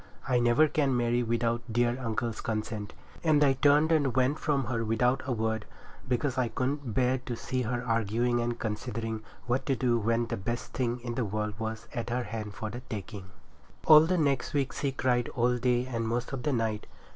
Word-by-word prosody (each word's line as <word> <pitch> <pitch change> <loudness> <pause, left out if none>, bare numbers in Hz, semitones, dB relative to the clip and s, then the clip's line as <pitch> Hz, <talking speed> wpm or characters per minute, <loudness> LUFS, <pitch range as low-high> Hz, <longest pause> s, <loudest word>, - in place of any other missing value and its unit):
I 125 -2 +3
never 120 +6 +4
can 140 -4 +1
marry 120 0 +1
without 115 0 0
dear 120 +1 +2
uncle's 115 0 -2
consent,' 110 -1 -4 0.3
and 155 -3 +4
I 135 -2 +5
turned 145 +4 +4
and 145 -6 +2
went 130 +3 +2
from 140 -3 +1
her 115 -1 -1
without 125 +4 +1
a - - -1
word, 110 -2 -1 0.4
because 130 +1 0
I 125 - +2
couldn't 130 -1 -2
bear 130 0 +2
to 125 -1 -5
see 130 +2 -2
her 120 +1 -2
arguing 115 +1 +1
and 120 0 -2
considering 110 0 -3 0.2
what 125 +2 -1
to 135 - +2
do, 120 -2 +1
when 115 +2 +1
the - - -3
best 120 +5 -4
thing 120 -1 -1
in 120 -1 -4
the 125 - -1
world 105 +1 -2
was 110 0 -4
to 120 - -2
her 125 - 0
hand 105 -2 -6
for 110 0 -4
the 120 - -6
taking. 100 -2 -6 0.6
All 155 -1 +10
the 185 +1 +2
next 140 -2 0
week 140 -2 0
she 140 - -1
cried 125 -2 0
all 125 0 +2
day 125 0 +2
and 115 -3 -2
most 120 +3 -2
of 135 - -3
the 150 - 0
night. 110 -4 -1
120 Hz, 205 wpm, -29 LUFS, 115-130 Hz, 0.6 s, All